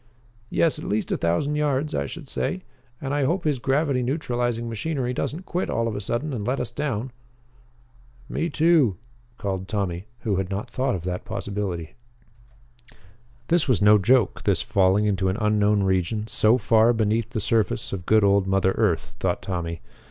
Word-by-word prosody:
"Yes, 165 - +1
at - - -7
least 105 +1 -1
a - - +2
thousand 85 - 0
yards, 150 0 0
I - - -1
should 160 -4 -9
say. 185 +7 -2 0.4
And 135 0 -3
I 145 -1 +1
hope 170 +6 0
his 150 -4 0
gravity 135 +1 +1
neutralizing 120 -3 -1
machinery 125 +2 -2
doesn't 160 +8 -3
quit 180 0 -2
all 115 0 0
of 110 - -3
a 100 - -3
sudden 125 +8 -2
and 110 -5 -3
let 125 +5 -1
us 120 - -3
down." 125 -2 -3 1.2
"Me, 165 - -2
too," 155 - +3 0.4
called 95 -1 -3
Tommy, 95 -4 -2 0.2
who 100 -4 0
had 95 -1 -2
not 105 +5 -4
thought 130 -1 0
of 85 - -5
that 90 0 -3
possibility. 95 -5 -4 1.6
This 170 -2 +3
was 125 -5 +3
no 105 +1 +6
joke, 115 +1 +3
this - - +1
falling 95 +2 +3
into 95 -2 +1
an 95 - -1
unknown 105 -1 +2
region 95 +3 0
so 110 +1 +3
far 115 0 +4
beneath 110 0 0
the 120 -3 -3
surface 110 -1 0
of 90 -3 -5
good 110 -1 +5
old 100 -1 +3
mother 95 0 +2
earth, 90 -8 +1
thought - - -1
Tommy. 85 -3 -4
110 Hz, 175 wpm, -24 LUFS, 100-135 Hz, 1.6 s, no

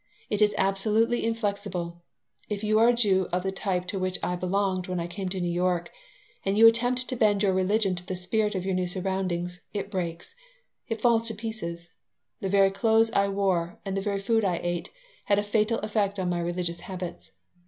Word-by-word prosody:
It 210 0 0
is 210 0 +4
absolutely 215 +5 +2
inflexible. 200 -6 -2 0.5
If 210 0 -3
you 215 0 +3
are 230 - +6
a 245 - +5
Jew 195 -6 +2
of 180 +1 0
the 190 - -1
type 190 -2 -2
to 195 - -2
which 185 0 -1
I 180 - 0
belonged 185 0 0
when 180 -1 -2
I 170 - -2
came 185 +2 -4
to 190 0 -3
New 175 -1 -1
York 175 0 0 0.5
and 195 +1 0
you 225 - +8
attempt 245 +2 +4
to 255 - -2
bend 210 -3 +3
your 195 -2 +3
religion 195 +1 +2
to 175 0 -4
the 185 - -2
spirit 210 +4 0
of 185 -1 -2
your 190 - 0
new 180 0 0
surroundings, 180 -1 -2
it 200 -1 -4
breaks. 175 - -4 0.6
It 225 -1 -3
falls 230 -1 +3
to 225 - -1
pieces. 175 -6 -5 0.5
The 195 - -2
very 195 0 +4
clothes 225 +3 +3
I 200 -3 +2
wore 190 -4 0
and 195 -1 -2
the 195 - 0
very 200 0 -1
food 225 +2 +1
I 180 -4 +1
ate 175 -1 -2 0.4
had 200 - +3
a 205 - +2
fatal 215 +2 +1
effect 205 -2 0
on 185 -2 -1
my 175 - -1
religious 170 0 -2
habits. 180 -2 -7
195 Hz, 205 wpm, -27 LUFS, 180-215 Hz, 0.6 s, you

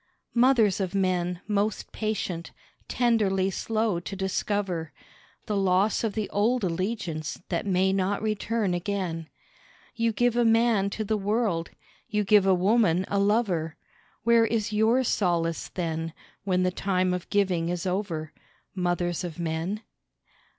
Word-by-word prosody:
Mothers 235 -5 +4
of 190 0 -2
Men, 180 -2 0
most 210 0 -1
patient, 200 -6 -3 0.4
tenderly 200 -6 +2
slow 215 -2 0
to 185 +3 -6
discover 190 -3 -2 0.5
The 210 - -2
loss 195 +3 +2
of 220 -3 0
the 215 -1 -2
old 230 +4 +1
allegiance 175 -3 -2
that 175 +3 -2
may 190 0 +2
not 195 +1 0
return 215 -2 0
again. 175 -3 -3 0.6
You 230 0 +1
give 240 +2 +1
a 240 - +3
man 225 -3 +3
to 215 - -3
the 215 +1 0
world, 205 -4 0 0.4
you 210 -1 +1
give 205 -1 +4
a 190 - +5
woman 190 -2 +3
a 200 - +1
lover 195 -6 +1 0.5
Where 230 0 +5
is 220 -1 -1
your 225 +5 +3
solace 170 -7 0
then 165 -2 -3 0.3
when 185 -2 +2
the 185 - +2
time 185 -1 0
of 180 0 -4
giving 185 -5 +1
is 175 +1 -3
over, 180 -5 -2 0.4
Mothers 175 -1 -1
of 170 -3 -6
Men? 170 +5 -3
195 Hz, 140 wpm, -27 LUFS, 175-215 Hz, 0.6 s, a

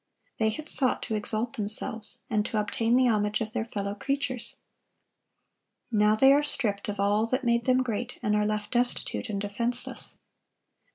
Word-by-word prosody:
They 220 -1 +3
had 310 +8 -6
sought 260 -4 +3
to 225 - -4
exalt 215 +2 0
themselves, 215 +1 0
and 215 -2 +1
to 220 - -1
obtain 225 +3 +1
the 255 0 +4
homage 210 -2 +1
of 220 -1 -3
their 230 -2 -1
fellow 200 -3 -4
creatures. 270 +2 -2 1.4
Now 210 -1 +4
they 270 +5 +6
are 290 - +4
stripped 210 -8 -1
of 205 -1 -4
all 205 +3 +2
that 255 +3 -1
made 235 -1 +1
them 255 0 +3
great, 245 0 -4
and 210 -2 +2
are 210 - +2
left 210 -1 -3
destitute 245 -2 0
and 200 -2 -2
defenseless. 235 +5 -3
220 Hz, 170 wpm, -27 LUFS, 210-245 Hz, 1.4 s, they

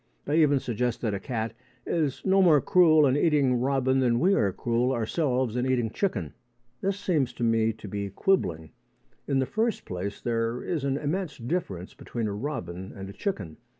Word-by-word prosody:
They 155 +3 +3
even 145 -3 +4
suggest 120 0 -2
that 110 -4 -1
a 100 - -2
cat 115 0 -3 0.3
is 150 -6 -1
no 195 0 +4
more 165 -6 +6
cruel 155 0 +5
in 130 -1 +3
eating 145 -5 +3
robin 130 0 +1
than 120 -2 +2
we 190 +4 +4
are 100 - +2
cruel 120 +5 0
ourselves 125 0 0
in 125 +1 0
eating 120 -4 0
chicken. 105 - -2 0.5
This 195 +1 -1
seems 155 -10 0
to 120 - -5
me 115 -1 +3
to 110 -1 -11
be 100 0 -4
quibbling. 90 - 0 0.6
In 140 - +1
the 135 - +2
first 225 - -1
place, 95 +3 -5
there 115 0 -1
is 160 -6 -2
an 135 0 0
immense 160 +4 -3
difference 115 - -4
between 115 -2 -5
a 105 - -2
robin 95 - -5
and 95 -1 -7
a - - -13
chicken. 95 - -4
125 Hz, 185 wpm, -27 LUFS, 110-150 Hz, 0.6 s, more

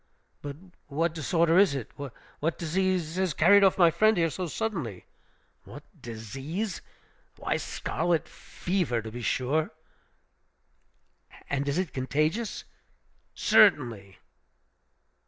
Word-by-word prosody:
"But 145 -1 -6 0.3
what 155 +3 0
disorder 165 +2 +2
is 195 -8 +4
it? 125 -5 -5
What 145 +3 -5
disease 180 0 -1
has 185 -6 0
carried 200 0 +6
off 190 - +4
my 170 -3 +6
friend 215 +4 +3
here 165 -2 +2
so 185 +2 -4
suddenly?" 160 - -4 0.6
"What - - -11 0.2
disease? 135 - -5 0.6
Why, - - -1
scarlet 170 -2 -1
fever, 175 - -2
to 110 - -7
be 120 +2 -7
sure." 135 +7 0 1.8
"And 140 0 0
is 140 - -1
it 185 -4 -2
contagious?" 155 - -1 0.7
"Certainly!" 120 - +3
160 Hz, 110 wpm, -28 LUFS, 135-185 Hz, 1.8 s, carried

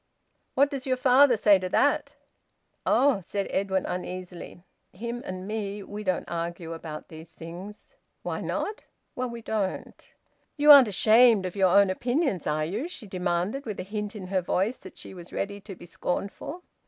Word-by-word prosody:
"What 280 +2 +4
does 275 -2 -5
your 255 -1 +1
father 255 0 +5
say 205 -2 +5
to 185 0 -4
that?" 285 +5 +1 0.7
"Oh!" 270 -7 +4
said 200 +3 -3
Edwin 190 -1 0
uneasily. 180 -1 -6 0.3
"Him 235 +5 -5
and 185 +1 -6
me 205 -1 -4
we 205 +2 -7
don't 185 -3 -1
argue 170 0 -4
about 160 -2 -8
these 160 0 -12
things." 175 +6 -10 0.3
"Why - - -3
not?" 420 - -3 0.3
"Well, 250 0 -2
we 235 -1 -8
don't." 210 -4 -4 0.5
"You 295 +1 +7
aren't 275 -4 +10
ashamed 220 +1 +5
of 185 - -5
your 190 -2 +4
own 200 +1 +5
opinions, 245 - -1
are 155 0 0
you?" 215 - -3
she 350 -10 -8
demanded, 190 +7 -2
with 210 - -4
a - - -3
hint 210 +2 -5
in 185 -3 -7
her 190 -1 +1
voice 195 +7 0
that - - -13
she - - -9
was 175 -2 -11
ready 200 0 -4
to 195 -1 -9
be - - -13
scornful. 200 - -4
200 Hz, 175 wpm, -27 LUFS, 180-240 Hz, 0.7 s, aren't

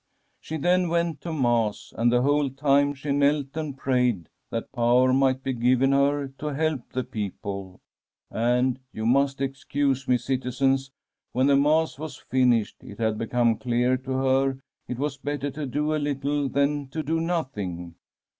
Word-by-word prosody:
' - - -45
" - - -46
She 160 - -5
then 180 +3 +2
went 170 -3 0
to 170 - -5
Mass, 120 -7 0
and 120 +1 +2
the 120 0 +3
whole 145 0 +2
time 140 +1 +2
she 140 +1 -4
knelt 140 0 +1
and 155 -4 -4
prayed 125 - 0 0.2
that 115 - -4
power 125 +1 +3
might 130 0 +2
be 130 - -1
given 125 +2 +3
her 140 +1 +2
to 150 - -4
help 155 -4 -1
the 130 - -2
people. 100 -5 -6 0.5
And 125 +2 +1
— 130 - -49
you 110 - -3
must 135 +3 +2
excuse 135 0 -1
me, 125 - +4
citizens 135 +1 0 0.2
— - - -60
when 130 +2 +2
the 140 0 +5
Mass 150 +1 +2
was 155 -3 -6
finished, 125 -4 +1
it 100 - -10
had 110 -2 0
become 115 0 +1
clear 125 +1 +1
to 130 +1 -5
her 135 +1 +2
that 135 - -15 0.3
it 125 - -4
was 140 +1 -2
better 145 +1 -3
to 145 +1 -5
do 150 +4 -1
a 155 - 0
little 145 0 -1
than 140 +1 0
to 155 +4 -4
do 160 +3 0
nothing. 105 - -3
135 Hz, 185 wpm, -25 LUFS, 125-145 Hz, 0.5 s, the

